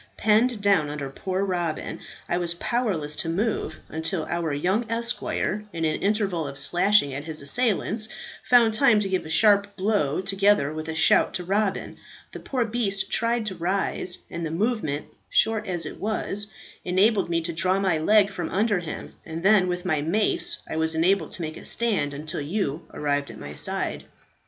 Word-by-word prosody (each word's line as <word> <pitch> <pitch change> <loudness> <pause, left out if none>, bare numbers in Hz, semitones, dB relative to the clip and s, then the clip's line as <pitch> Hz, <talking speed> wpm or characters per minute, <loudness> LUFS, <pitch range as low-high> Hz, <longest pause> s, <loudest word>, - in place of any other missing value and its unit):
Penned 220 +1 +2
down 195 -7 +3
under 145 -2 -5
poor 190 +6 -2
Robin, 175 -4 -3 0.3
I 175 - 0
was 170 -1 0
powerless 175 -9 -1
to 165 - -2
move 190 -3 -1
until 160 +1 -2
our 170 -2 -2
young 190 +10 0
esquire, 230 -2 -1
in 165 -2 -2
an 155 0 -1
interval 195 -6 0
of 140 0 -7
slashing 175 -1 +3
at 140 +2 -5
his 155 -3 -4
assailants, 220 - +1 0.3
found 235 -3 +5
time 220 -2 +4
to 200 - -1
give 185 -4 -2
a - - -9
sharp 205 +2 +4
blow 190 -7 0
together 195 -5 +2
with 155 +1 -6
a 160 - -4
shout 165 - +4
to 180 - -2
Robin. 195 +2 -1 0.3
The - - -8
poor 255 -3 -1
beast 215 -4 -1
tried 230 0 +1
to 195 -3 -3
rise, 180 0 -1
and 170 0 -5
the 160 - -2
movement, 165 - -1 0.2
short 220 -1 +3
as 175 -3 -2
it - - -8
was, 205 -1 -2 0.4
enabled 195 +2 +2
me 170 -1 +1
to 170 +1 -4
draw 185 +3 +2
my 190 -5 +1
leg 205 +4 +4
from 175 -4 -4
under 205 -1 +1
him, 170 -2 -7
and 165 +1 -7
then 195 -2 +5
with 180 +1 -3
my 155 -5 +1
mace 190 +8 +1
I - - -4
was 160 0 +1
enabled 185 +5 +1
to 175 - -2
make 155 0 -5
a - - -11
stand 195 -12 +1
until 150 +1 -4
you 160 0 -3
arrived 145 -2 -1
at 110 -2 -10
my 75 - -8
side. - - -2
185 Hz, 185 wpm, -25 LUFS, 160-210 Hz, 0.4 s, found